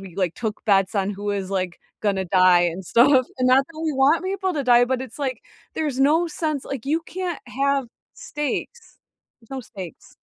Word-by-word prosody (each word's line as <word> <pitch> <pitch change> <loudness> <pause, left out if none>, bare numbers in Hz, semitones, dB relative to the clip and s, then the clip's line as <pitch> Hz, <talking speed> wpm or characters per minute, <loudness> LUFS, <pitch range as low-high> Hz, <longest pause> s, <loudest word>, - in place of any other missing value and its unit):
we, 190 -3 -11
like, 180 -4 -1
took 220 -3 -4
bets 195 -1 +3
on 195 -1 0
who 205 +1 -7
was, 200 -2 -2
like, 185 -2 -2 0.2
gonna 195 -3 0
die 185 -1 +5
and 175 +2 -1
stuff. 255 - +4
And 255 0 +2
not 265 +2 +5
that 325 -1 -11
we 315 -2 0
want 280 +6 +3
people 380 -1 -1
to 290 -3 -2
die, 245 -1 +5
but 255 0 -1
it's 255 0 -10
like, 260 -5 -3 0.3
there's 295 -5 -2
no 315 +5 +3
sense, 305 -3 -3
like, 270 -4 -5
you 315 +3 +1
can't 360 -2 -5
have 275 +1 0 0.3
stakes. 295 - -5 0.4
There's 225 - -24
no 270 -1 -4
stakes. 190 - -11
255 Hz, 200 wpm, -23 LUFS, 195-295 Hz, 0.4 s, die